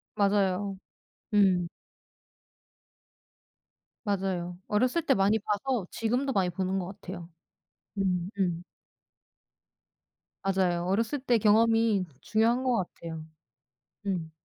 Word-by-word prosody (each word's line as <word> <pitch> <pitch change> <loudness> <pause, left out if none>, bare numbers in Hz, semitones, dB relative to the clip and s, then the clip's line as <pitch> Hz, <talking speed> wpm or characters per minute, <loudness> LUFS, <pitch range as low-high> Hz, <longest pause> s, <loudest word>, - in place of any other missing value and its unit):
맞아요. 200 -1 +1 0.6
음. 190 -4 +4 2.4
맞아요. 185 -4 -2
어렸을 255 +10 +1
때 280 -4 +3
많이 205 +1 +3
봐서 215 +1 -1
지금도 250 +5 0
많이 190 -5 +2
보는 185 +2 -1
것 180 - -3
같아요. 175 -3 -7 0.7
음 180 -2 0
음. 175 -2 0 1.8
맞아요. 185 -3 +1
어렸을 225 +9 0
때 250 -3 +2
경험이 225 -1 +4 0.2
중요한 230 +3 +2
것 250 -2 +2
같아요. 165 -4 -5 0.8
음. 175 -5 -2
195 Hz, 190 characters per minute, -29 LUFS, 180-225 Hz, 2.4 s, 음